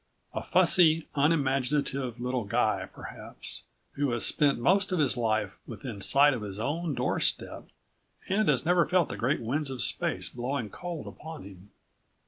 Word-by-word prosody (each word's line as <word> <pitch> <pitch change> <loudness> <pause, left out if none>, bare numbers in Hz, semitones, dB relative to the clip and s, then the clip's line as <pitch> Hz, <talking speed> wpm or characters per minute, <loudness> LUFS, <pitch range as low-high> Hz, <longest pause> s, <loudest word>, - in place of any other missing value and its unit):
A - - -3
fussy, 165 -3 +3
unimaginative 140 -3 +1
little 125 0 -2
guy, 100 - 0
perhaps, - - -6 0.3
who 145 -1 -1
has 120 - +3
spent 145 -2 +3
most 190 +11 +2
of 185 - +1
his 145 -5 +2
life 110 -5 -1
within 115 -7 -7
sight 145 +6 +5
of 125 - -4
his 100 -1 -6
own 155 +5 -2
doorstep 125 - 0 0.6
and 205 +1 +1
has 135 -1 +2
never 175 0 +3
felt 180 -3 +2
the - - -4
great 135 +6 0
winds 135 +6 -1
of 130 -3 -1
space - - 0
blowing 125 -3 -4
cold 175 -4 -6
upon 160 0 -9
him. 95 0 -13
140 Hz, 155 wpm, -28 LUFS, 120-160 Hz, 0.6 s, sight